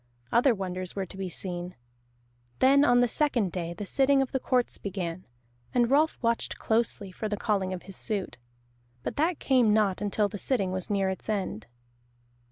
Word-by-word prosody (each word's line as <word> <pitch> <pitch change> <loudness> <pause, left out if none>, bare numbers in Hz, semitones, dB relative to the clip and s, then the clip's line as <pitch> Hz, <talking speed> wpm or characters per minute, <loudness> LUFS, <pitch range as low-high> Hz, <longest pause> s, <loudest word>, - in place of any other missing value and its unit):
Other 245 0 +4
wonders 185 -2 -5
were 195 -1 -2
to 185 - -11
be 190 -1 -4
seen. 175 0 -5 0.8
Then 275 +2 +5
on 245 -3 +5
the 245 - +4
second 240 - +1
day 170 -1 -4
the 205 - -5
sitting 270 +6 +3
of 270 -1 0
the 265 - 0
courts 250 -1 0
began, 185 -3 -4 0.5
and 240 0 +3
Rolf 305 +3 +3
watched 230 0 0
closely 220 -3 0
for 215 +3 -4
the 210 - -2
calling 200 -3 0
of 185 -1 -5
his 195 0 -10
suit. 200 - -3 0.6
But - - -3
that 325 +3 +1
came 245 -6 +3
not 205 -3 +2
until 205 0 +1
the 205 0 -7
sitting 200 -7 0
was 185 -1 -3
near 195 -2 +1
its 190 - -7
end. 190 - -2
205 Hz, 180 wpm, -28 LUFS, 185-245 Hz, 0.8 s, Then